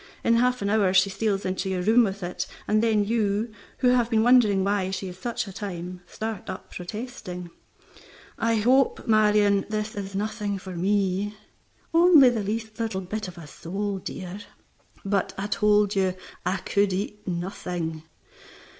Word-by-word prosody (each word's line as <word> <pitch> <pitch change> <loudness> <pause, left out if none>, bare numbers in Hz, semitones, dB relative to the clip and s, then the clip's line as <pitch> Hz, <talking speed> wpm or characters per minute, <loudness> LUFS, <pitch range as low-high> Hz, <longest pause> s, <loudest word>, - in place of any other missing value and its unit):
In 230 - +4
half 250 -1 +2
an 200 - 0
hour 200 -3 +3
she 190 +1 +5
steals 200 0 -1
into 185 +1 -2
your 185 -1 -1
room 225 +5 +5
with 200 -2 -3
it, 175 +1 -3 0.2
and 215 +1 +3
then 220 -3 +2
you 215 0 0 0.3
(who 250 - +3
have 245 -2 +3
been 220 -2 +3
wondering 225 -6 +5
why 195 -1 0
she 190 0 -4
is 180 +1 -11
such 235 +3 -2
a 195 - -9
time) 180 -3 -6
start 220 -3 -5
up - - -7
protesting, 180 -3 -7 0.8
"I 230 0 +1
hope, 250 +5 +3
Marion, 210 -2 +4
this 215 0 -2
is 195 -1 -6
nothing 210 0 -2
for 185 -1 -8
me." 200 +2 0 0.6
"Only 330 -6 +7
the 230 -3 -1
least 220 +2 -4
little 220 -4 -2
bit 210 +3 -4
of 180 0 -10
a 165 - -9
sole, 195 +7 -4
dear." 185 +1 -6 0.7
"But 195 -1 0
I 195 - -3
told 210 0 +2
you 190 -1 +1 0.3
I 185 +2 +1
could 200 0 +1
eat 205 +2 -4
nothing." 175 -2 -3
205 Hz, 165 wpm, -25 LUFS, 190-220 Hz, 0.8 s, Only